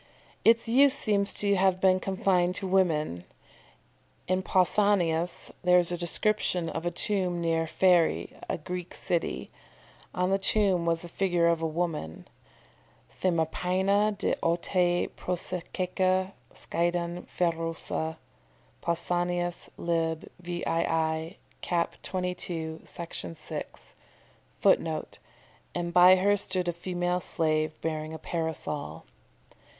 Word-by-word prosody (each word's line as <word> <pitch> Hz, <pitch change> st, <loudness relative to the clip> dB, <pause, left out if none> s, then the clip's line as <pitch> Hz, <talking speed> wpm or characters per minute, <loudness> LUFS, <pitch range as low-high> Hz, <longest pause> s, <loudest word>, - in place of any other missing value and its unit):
"] -, -, -30 dB
Its 230 Hz, +1 st, +5 dB
use 270 Hz, +4 st, +5 dB
seems 200 Hz, -4 st, +2 dB
to 200 Hz, -1 st, +1 dB
have 190 Hz, -1 st, +2 dB
been 185 Hz, 0 st, +4 dB
confined 185 Hz, -2 st, +1 dB
to 195 Hz, -, -2 dB
women. 160 Hz, -, +1 dB, 1.0 s
In 185 Hz, +1 st, +1 dB
Pausanias 180 Hz, -3 st, +1 dB
there 180 Hz, 0 st, +5 dB
is 175 Hz, -1 st, +3 dB
a -, -, 0 dB
description 180 Hz, -1 st, 0 dB
of 165 Hz, +2 st, -3 dB
a -, -, +3 dB
tomb 180 Hz, 0 st, 0 dB
near 165 Hz, -1 st, +1 dB
Pharæ, 175 Hz, 0 st, +2 dB
a -, -, -1 dB
Greek 180 Hz, +2 st, -6 dB
city. 65 Hz, -, -2 dB, 0.6 s
On 180 Hz, +1 st, +1 dB
the 195 Hz, -, +2 dB
tomb 195 Hz, -4 st, +2 dB
was 165 Hz, 0 st, +1 dB
the -, -, -7 dB
figure 175 Hz, -1 st, +1 dB
of 170 Hz, -1 st, +2 dB
a 165 Hz, -, 0 dB
woman 155 Hz, -, -3 dB, 0.9 s
"themapaina 185 Hz, +4 st, +1 dB
de -, -, 0 dB
autae 175 Hz, +1 st, +1 dB
prosestaeke 185 Hz, +1 st, -1 dB, 0.2 s
skiadeion 175 Hz, +1 st, -2 dB
pherousa." 165 Hz, -1 st, -2 dB, 0.6 s
Pausanias, 175 Hz, +1 st, -1 dB
lib. 165 Hz, -1 st, -1 dB
vii., 165 Hz, -1 st, -1 dB, 0.2 s
cap. 170 Hz, -1 st, -1 dB
22, 175 Hz, -3 st, -3 dB
Section 95 Hz, -, -6 dB
6. -, -, -8 dB, 0.7 s
[Footnote: -, -, +1 dB, 0.6 s
"And 170 Hz, -1 st, -2 dB
by 180 Hz, +1 st, +8 dB
her 200 Hz, +2 st, +3 dB
stood 185 Hz, -2 st, -1 dB
a 175 Hz, -, 0 dB
female 175 Hz, +1 st, -1 dB
slave, 155 Hz, -2 st, 0 dB
bearing 155 Hz, 0 st, -3 dB
a -, -, -5 dB
parasol." 150 Hz, -, -4 dB
175 Hz, 115 wpm, -28 LUFS, 165-185 Hz, 1.0 s, by